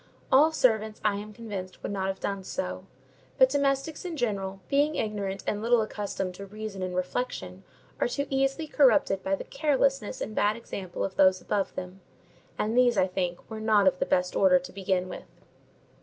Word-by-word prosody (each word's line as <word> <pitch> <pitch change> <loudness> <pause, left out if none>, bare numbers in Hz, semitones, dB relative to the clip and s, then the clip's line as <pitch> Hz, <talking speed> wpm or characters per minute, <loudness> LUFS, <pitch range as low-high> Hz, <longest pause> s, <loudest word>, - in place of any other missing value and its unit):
All 295 +5 +6
servants, 220 -7 +1
I 205 -1 +2
am 210 +1 -7
convinced, 200 -4 -7
would - - -3
not 190 -1 -1
have 190 0 -3
done 200 -1 -3
so; 90 - -4 0.5
but 260 - +6
domestics 280 +3 0
in 345 -3 -5
general, 195 -6 -2
being 290 +2 +2
ignorant 200 -3 -2
and 205 - -1
little 235 0 +3
accustomed 200 -3 -4
to 200 +2 -9
reason 210 -1 -6
and 185 -1 -3
reflection, 185 -1 -3 0.4
are - - +2
too 280 +4 -2
easily 270 +3 +1
corrupted 275 -9 +3
by 195 +1 0
the - - -7
carelessness 275 -5 0
and 215 - -4
bad 210 0 +2
example 195 -6 -5
of 190 - -4
those 185 -1 +5
above 200 0 -2
them; 185 +1 -7 0.6
and 220 +2 -1
these, 245 -2 +4
I - - +5
think, 180 -2 -3
were 220 -1 -7
not 215 -3 +4
of 180 - +3
the - - 0
best 180 0 +1
order 185 -2 +6
to 180 0 -7
begin 190 -1 0
with. - - -9
205 Hz, 185 wpm, -28 LUFS, 190-245 Hz, 0.6 s, All